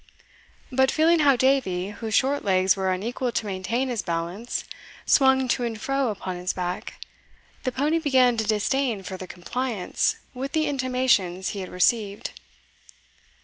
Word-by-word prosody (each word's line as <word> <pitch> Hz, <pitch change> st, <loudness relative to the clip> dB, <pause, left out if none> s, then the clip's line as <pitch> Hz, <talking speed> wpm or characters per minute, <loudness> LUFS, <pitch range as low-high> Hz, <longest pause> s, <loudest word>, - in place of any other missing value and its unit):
But 265 Hz, +1 st, +3 dB
feeling 325 Hz, +3 st, +3 dB
how 285 Hz, -3 st, +5 dB
Davie, 235 Hz, -8 st, +1 dB
whose 220 Hz, 0 st, -3 dB
short 275 Hz, +2 st, +2 dB
legs 190 Hz, -1 st, +3 dB
were 190 Hz, -1 st, 0 dB
unequal 235 Hz, +6 st, -2 dB
to -, -, -1 dB
maintain 210 Hz, +7 st, -2 dB
his 235 Hz, -4 st, -1 dB
balance, 170 Hz, +7 st, -3 dB, 0.4 s
swung 265 Hz, -1 st, +4 dB
to 245 Hz, -, +1 dB
and 225 Hz, -2 st, -3 dB
fro 270 Hz, +2 st, 0 dB
upon 190 Hz, -3 st, -4 dB
his 180 Hz, +1 st, -2 dB
back, 180 Hz, 0 st, -4 dB, 0.7 s
the 255 Hz, -, +1 dB
pony 295 Hz, +6 st, +1 dB
began 260 Hz, -5 st, +4 dB
to 220 Hz, -, +1 dB
disdain 220 Hz, +1 st, 0 dB
furthur 185 Hz, 0 st, -7 dB
compliance 220 Hz, +3 st, -2 dB, 0.2 s
with 265 Hz, +2 st, -5 dB
the 315 Hz, -1 st, +2 dB
intimations 255 Hz, -9 st, +1 dB
he 200 Hz, -, -5 dB
had 185 Hz, -, -6 dB
received. 205 Hz, +3 st, 0 dB
235 Hz, 145 wpm, -25 LUFS, 190-265 Hz, 0.7 s, how